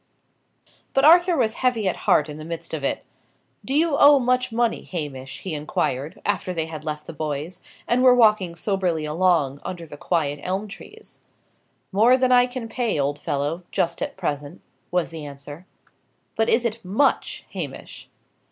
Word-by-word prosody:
But 270 Hz, +1 st, +4 dB
Arthur 350 Hz, +2 st, +6 dB
was 225 Hz, -4 st, +2 dB
heavy 245 Hz, -5 st, +1 dB
at -, -, +1 dB
heart 150 Hz, -, +4 dB
in 150 Hz, -1 st, -8 dB
the 155 Hz, -, -8 dB
midst 165 Hz, +1 st, -6 dB
of 155 Hz, -3 st, -3 dB
it. -, -, -2 dB, 0.6 s
"Do 270 Hz, -, -2 dB
you 315 Hz, -1 st, +3 dB
owe 285 Hz, 0 st, +8 dB
much 255 Hz, -1 st, +1 dB
money, 235 Hz, 0 st, 0 dB
Hamish?" 140 Hz, -6 st, -6 dB
he 185 Hz, -, -5 dB
inquired, 145 Hz, 0 st, -2 dB
after 185 Hz, -3 st, -1 dB
they 160 Hz, -1 st, -1 dB
had 155 Hz, -2 st, -8 dB
left 150 Hz, -1 st, -5 dB
the -, -, -8 dB
boys, 155 Hz, +4 st, -4 dB, 0.3 s
and 240 Hz, +1 st, +2 dB
were 255 Hz, -1 st, +7 dB
walking 215 Hz, -7 st, +3 dB
soberly 180 Hz, -4 st, -1 dB
along, 155 Hz, -4 st, +1 dB
under 175 Hz, -2 st, -6 dB
the 145 Hz, -, -11 dB
quiet 145 Hz, -3 st, -1 dB
elm 190 Hz, +5 st, -2 dB
trees. 430 Hz, -, -12 dB, 0.7 s
"More 225 Hz, +6 st, +5 dB
than 255 Hz, -1 st, +2 dB
I 245 Hz, 0 st, +6 dB
can 245 Hz, -2 st, -6 dB
pay, 225 Hz, -, -1 dB
old 145 Hz, +1 st, -1 dB
fellow, 145 Hz, +5 st, -2 dB
just 165 Hz, -, -1 dB
at -, -, -4 dB
present," 150 Hz, -3 st, -4 dB, 0.3 s
was 180 Hz, -2 st, 0 dB
the 160 Hz, -2 st, -7 dB
answer. 145 Hz, +4 st, -10 dB, 0.7 s
"But 225 Hz, 0 st, +1 dB
is 240 Hz, +1 st, +3 dB
it 230 Hz, 0 st, -3 dB
much, 210 Hz, +10 st, 0 dB
Hamish?" -, -, -7 dB
180 Hz, 170 wpm, -23 LUFS, 150-240 Hz, 0.7 s, owe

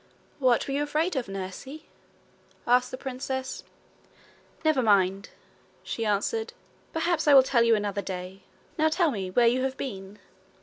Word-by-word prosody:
'What 255 Hz, -3 st, +2 dB
were 275 Hz, -, -3 dB
you 285 Hz, -, 0 dB
afraid 305 Hz, +4 st, 0 dB
of, 255 Hz, -5 st, -2 dB
nursie?' 195 Hz, +10 st, -7 dB, 0.8 s
asked 250 Hz, +1 st, +3 dB
the 255 Hz, -, -6 dB
princess. 265 Hz, 0 st, -5 dB, 1.0 s
'Never 310 Hz, -4 st, +3 dB
mind,' 195 Hz, -3 st, +2 dB, 0.5 s
she 225 Hz, -1 st, -3 dB
answered. 210 Hz, -, -1 dB, 0.4 s
'Perhaps 325 Hz, -1 st, 0 dB
I 290 Hz, -, +7 dB
will 265 Hz, -, +9 dB
tell 255 Hz, -2 st, +2 dB
you 230 Hz, -1 st, +5 dB
another 205 Hz, -1 st, -2 dB
day. 185 Hz, 0 st, -7 dB, 0.4 s
Now 315 Hz, +1 st, +4 dB
tell 335 Hz, -1 st, +2 dB
me 195 Hz, -6 st, -4 dB
where 235 Hz, +6 st, +3 dB
you 245 Hz, +2 st, +3 dB
have 265 Hz, 0 st, -2 dB
been.' 195 Hz, -5 st, -6 dB
250 Hz, 150 wpm, -27 LUFS, 200-285 Hz, 1.0 s, will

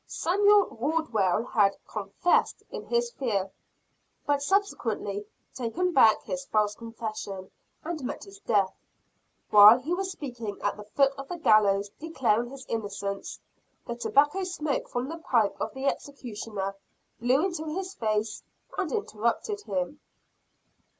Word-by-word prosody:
Samuel 405 Hz, +3 st, +4 dB
Wardwell 230 Hz, -, +1 dB
had 200 Hz, -4 st, +2 dB
"confessed" 210 Hz, -, 0 dB
in -, -, -7 dB
his 475 Hz, 0 st, +1 dB
fear, 200 Hz, -, -1 dB, 0.7 s
but 285 Hz, -1 st, +1 dB
subsequently 230 Hz, -, -1 dB, 0.3 s
taken 265 Hz, +10 st, -1 dB
back 220 Hz, -6 st, +6 dB
his 275 Hz, 0 st, -4 dB
false 210 Hz, -4 st, +1 dB
confession, 215 Hz, -4 st, -6 dB, 0.3 s
and 320 Hz, -3 st, -4 dB
met -, -, -4 dB
his 395 Hz, 0 st, -13 dB
death. 200 Hz, -, +1 dB, 0.8 s
While 210 Hz, +2 st, +10 dB
he 285 Hz, +7 st, -3 dB
was 380 Hz, +1 st, -1 dB
speaking 245 Hz, -, -6 dB
at 205 Hz, -, +1 dB
the 210 Hz, -, -10 dB
foot 275 Hz, +6 st, +2 dB
of 275 Hz, -, -6 dB
the 350 Hz, -, -5 dB
gallows 205 Hz, -7 st, +4 dB
declaring 240 Hz, -7 st, 0 dB
his 270 Hz, 0 st, -10 dB
innocence, 200 Hz, -2 st, -4 dB, 0.5 s
the 235 Hz, -, -4 dB
tobacco 295 Hz, +9 st, +2 dB
smoke 310 Hz, -6 st, -2 dB
from 245 Hz, +1 st, -2 dB
the 330 Hz, +3 st, -6 dB
pipe 230 Hz, -9 st, +2 dB
of -, -, -1 dB
the 265 Hz, +1 st, -4 dB
executioner, 220 Hz, -8 st, -3 dB, 0.4 s
blew 255 Hz, +8 st, +3 dB
into 340 Hz, -4 st, -3 dB
his 370 Hz, +5 st, -4 dB
face 215 Hz, -, -1 dB, 0.4 s
and 370 Hz, -5 st, -1 dB
interrupted 410 Hz, -, -1 dB
him. 190 Hz, +9 st, -2 dB
245 Hz, 135 wpm, -28 LUFS, 210-320 Hz, 0.8 s, While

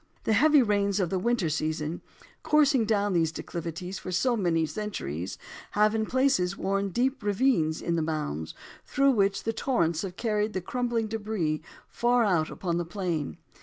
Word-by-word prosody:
The 220 Hz, -, +1 dB
heavy 290 Hz, +4 st, +5 dB
rains 200 Hz, -2 st, +1 dB
of 180 Hz, -4 st, 0 dB
the 190 Hz, -, 0 dB
winter 235 Hz, -3 st, +1 dB
season 155 Hz, +1 st, -2 dB, 0.4 s
coursing 285 Hz, -6 st, +3 dB
down 205 Hz, -2 st, +1 dB
these 165 Hz, -2 st, +2 dB
declivities 170 Hz, +3 st, -5 dB
for 185 Hz, -, -6 dB
so 240 Hz, +7 st, +2 dB
many 170 Hz, -6 st, +1 dB
centuries, 95 Hz, -, -4 dB, 0.4 s
have 210 Hz, +1 st, +3 dB
in 220 Hz, -1 st, 0 dB
places 260 Hz, -9 st, +2 dB
worn 195 Hz, +1 st, -1 dB
deep 255 Hz, +7 st, 0 dB
ravines 205 Hz, -7 st, +1 dB
in 170 Hz, 0 st, 0 dB
the -, -, +1 dB
mounds, 150 Hz, -, -3 dB, 0.3 s
through 275 Hz, 0 st, +3 dB
which 200 Hz, -4 st, +1 dB
the 225 Hz, -, -1 dB
torrents 170 Hz, -, 0 dB
have 185 Hz, -3 st, -5 dB
carried 210 Hz, -2 st, 0 dB
the 185 Hz, -, -1 dB
crumbling 240 Hz, +3 st, -1 dB
debris 210 Hz, -8 st, -2 dB, 0.3 s
far 240 Hz, 0 st, +2 dB
out 175 Hz, -7 st, +2 dB
upon 170 Hz, -2 st, -2 dB
the -, -, 0 dB
plain. 170 Hz, -, -3 dB
200 Hz, 165 wpm, -27 LUFS, 170-225 Hz, 0.4 s, heavy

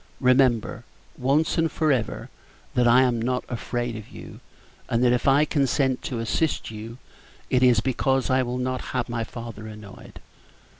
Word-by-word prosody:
Remember, 125 Hz, -3 st, +2 dB, 0.3 s
once 145 Hz, +6 st, +1 dB
and 165 Hz, -1 st, +1 dB
for 155 Hz, -2 st, +1 dB
ever, 120 Hz, -5 st, -2 dB, 0.4 s
that 125 Hz, -1 st, +3 dB
I 125 Hz, +2 st, +6 dB
am 120 Hz, -3 st, +1 dB
not 125 Hz, +2 st, -1 dB
afraid 120 Hz, -1 st, -3 dB
of 110 Hz, -2 st, -8 dB
you; -, -, -11 dB, 0.5 s
and 115 Hz, +1 st, +1 dB
that 125 Hz, -1 st, +4 dB
if 125 Hz, -, 0 dB
I 140 Hz, +3 st, +5 dB
consent 135 Hz, -3 st, +1 dB
to 125 Hz, -, -3 dB
assist 115 Hz, +5 st, -1 dB
you, 110 Hz, +2 st, -8 dB, 0.5 s
it 125 Hz, -, +3 dB
is 125 Hz, -4 st, +5 dB
because 130 Hz, +1 st, 0 dB
I 130 Hz, 0 st, +3 dB
will 125 Hz, 0 st, -3 dB
not 130 Hz, 0 st, -2 dB, 0.2 s
have -, -, -2 dB
my 115 Hz, -1 st, -2 dB
father 115 Hz, -2 st, -8 dB
annoyed. 105 Hz, -2 st, -11 dB
125 Hz, 165 wpm, -24 LUFS, 115-130 Hz, 0.5 s, I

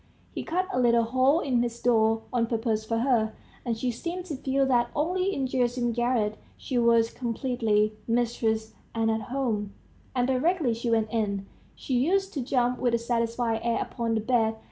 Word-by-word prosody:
He -, -, -3 dB
cut 365 Hz, +3 st, -1 dB
a -, -, +1 dB
little 235 Hz, -1 st, +4 dB
hole 260 Hz, +7 st, +3 dB
in 250 Hz, -4 st, +1 dB
his 235 Hz, -1 st, -3 dB
door 225 Hz, -2 st, +2 dB
on 235 Hz, -2 st, +1 dB
purpose 225 Hz, -2 st, -1 dB
for 230 Hz, +1 st, -1 dB
her, 230 Hz, -3 st, +2 dB, 0.3 s
and 235 Hz, -3 st, -2 dB
she 245 Hz, +2 st, -1 dB
seemed 345 Hz, +9 st, -5 dB
to 320 Hz, -5 st, -4 dB
feel 270 Hz, +1 st, 0 dB
that 240 Hz, -2 st, +2 dB
only 365 Hz, +5 st, 0 dB
in 275 Hz, -8 st, -1 dB
Gerasim's 245 Hz, -2 st, 0 dB
garret 240 Hz, -3 st, 0 dB, 0.2 s
she 255 Hz, -3 st, -2 dB
was 230 Hz, -1 st, +4 dB
completely 230 Hz, -3 st, 0 dB
mistress 230 Hz, -2 st, 0 dB, 0.2 s
and 225 Hz, 0 st, +2 dB
at 220 Hz, 0 st, -1 dB
home; 225 Hz, -6 st, -2 dB, 0.4 s
and 250 Hz, -1 st, +2 dB
directly 265 Hz, +1 st, +1 dB
she 235 Hz, +1 st, -3 dB
went 225 Hz, -1 st, +2 dB
in, 200 Hz, -3 st, -1 dB, 0.3 s
she 265 Hz, -, -5 dB
used 385 Hz, +10 st, +1 dB
to 280 Hz, -, -2 dB
jump 245 Hz, -1 st, 0 dB
with 245 Hz, -2 st, +2 dB
a -, -, +3 dB
satisfied 230 Hz, -1 st, -1 dB
air 235 Hz, -1 st, +1 dB
upon 230 Hz, -2 st, -2 dB
the 220 Hz, -, 0 dB
bed. 225 Hz, -1 st, +1 dB
240 Hz, 185 wpm, -27 LUFS, 225-260 Hz, 0.4 s, little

